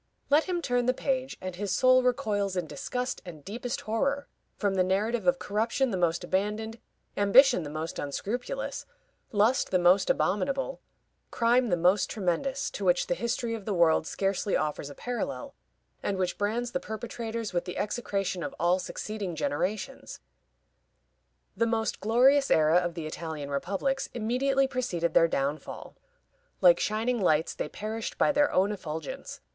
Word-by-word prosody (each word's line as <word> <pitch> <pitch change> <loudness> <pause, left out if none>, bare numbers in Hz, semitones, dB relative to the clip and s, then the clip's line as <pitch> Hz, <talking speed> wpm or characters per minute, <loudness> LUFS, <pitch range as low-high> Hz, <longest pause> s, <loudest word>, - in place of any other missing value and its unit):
Let 300 +3 +5
him 355 -2 -2
turn 245 -2 +1
the 255 - +3
page, 260 0 -2
and 185 -1 -5
his 200 +1 -3
soul 255 +4 +5
recoils 210 -6 0
in 180 - -1
disgust 250 - -4
and 160 -6 -11
deepest 240 +4 -4
horror 275 +6 -1 0.3
from 200 -2 0
the 185 -1 +3
narrative 210 +6 0
of 270 0 +4
corruption 230 +5 0
the - - -1
most 175 -1 +1
abandoned, 210 +5 -2 0.4
ambition 240 +3 +6
the 150 - -6
most 155 +2 -5
unscrupulous, 245 - -4 0.4
lust 220 +5 +2
the 185 - +3
most 180 +2 +4
abominable, 275 - 0 0.5
crime 240 +1 +3
the 175 - +2
most 180 +4 +3
tremendous, 225 +8 -1
to 205 - -5
which 180 -1 +3
the - - 0
history 235 +5 -2
of 220 -3 -6
the 205 - -1
world 160 -2 +3
scarcely 195 0 0
offers 150 -1 -3
a 145 - -10
parallel, 235 - -4 0.5
and 200 - -1
which 185 -1 -1
brands 230 +4 -1
the 180 - -1
perpetrators 225 0 -5
with 175 - 0
the 180 - -6
execration 200 -4 -2
of - - -5
all 175 +2 +3
succeeding 200 -2 -5
generations. 180 - -3 1.4
The 230 - +1
most 225 -1 -1
glorious 260 +6 +4
era 155 +2 +5
of 175 -1 0
the 165 -3 -5
Italian 155 -2 -5
republics 200 - -1
immediately 265 +4 +1
preceded 180 -11 -1
their 165 - +6
downfall. 145 0 -3 0.6
Like - - +6
shining 225 +2 0
lights, 160 -3 +2
they - - -4
perished 220 +1 -5
by - - +4
their 290 0 +3
own 195 +3 +2
effulgence. 160 -6 -6
210 Hz, 160 wpm, -28 LUFS, 175-245 Hz, 1.4 s, ambition